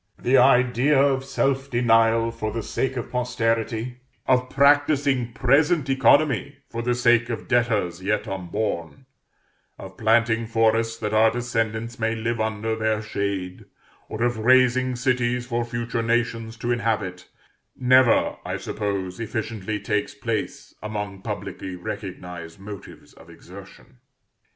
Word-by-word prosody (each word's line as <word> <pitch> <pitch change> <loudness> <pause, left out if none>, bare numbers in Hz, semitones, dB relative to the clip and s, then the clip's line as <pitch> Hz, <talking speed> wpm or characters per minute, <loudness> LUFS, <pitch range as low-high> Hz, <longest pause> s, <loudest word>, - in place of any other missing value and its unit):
The 125 - +1
idea 125 +3 +4
of 135 -1 +2
self 135 0 -1
denial 115 -1 +3
for 110 -1 -4
the 115 +1 -4
sake 130 +4 -2
of 120 - -5
posterity, 120 -1 -1 0.3
of 130 0 +2
practising 140 -3 +3
present 140 +4 +2
economy 135 +1 +3
for 115 - -3
the 120 +1 0
sake 120 -1 +3
of 115 - -5
debtors 110 -8 0
yet 105 +4 -1
unborn, 95 +3 -4 0.7
of - - -11
planting 115 0 +2
forests 115 0 +1
that 105 0 -3
our 110 +1 +5
descendants 115 -1 -3
may 110 0 0
live 115 +1 -2
under 110 0 -2
their 110 -1 -1
shade, 100 -3 -4 0.4
or 110 +2 -3
of 120 -2 0
raising 130 +2 +3
cities 125 -1 0
for 120 -1 -1
future 120 0 -3
nations 115 -1 -1
to 120 +1 -2
inhabit, 110 -6 -2 0.5
never, 130 -1 +4
I - - -3
suppose, 100 -2 -4
efficiently 110 -2 -4
takes 105 0 -2
place - - -4
among 105 -2 -5
publicly 95 -1 -6
recognised 90 -2 -7
motives 100 0 -11
of 85 - -17
exertion. 95 +8 -14
115 Hz, 130 wpm, -24 LUFS, 110-125 Hz, 0.7 s, our